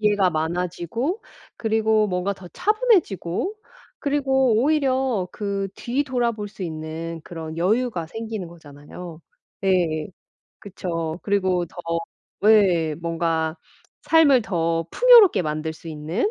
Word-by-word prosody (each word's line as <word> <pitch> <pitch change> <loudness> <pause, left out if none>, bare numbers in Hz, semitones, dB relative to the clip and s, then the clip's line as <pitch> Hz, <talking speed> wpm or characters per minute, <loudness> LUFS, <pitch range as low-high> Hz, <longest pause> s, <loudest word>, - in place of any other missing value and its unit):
기회가 205 -3 +3
많아지고 180 - -2 0.3
그리고 220 -1 +2
뭔가 180 +2 -1
더 185 -2 -12
차분해지고 380 - +1 0.5
그리고 270 -4 +2
오히려 265 - +1
그 200 -1 -3
뒤돌아 250 -2 0
볼 210 -2 -6
수 195 -2 -7
있는 160 0 -5
그런 160 -1 -7
여유가 195 0 0
생기는 220 -3 -5
거잖아요. 160 +1 -11 0.4
네. 175 -6 +1 0.5
그쵸. 170 -5 -4
그리고 185 -3 +1
더 - - -22 0.7
예 185 -8 +4
뭔가 165 -1 -1 0.5
삶을 290 -6 +5
더 165 -5 0
풍요롭게 480 - +7
만들 155 -1 -2
수 165 +1 -12
있는 160 - -2
190 Hz, 245 characters per minute, -23 LUFS, 165-235 Hz, 0.7 s, 풍요롭게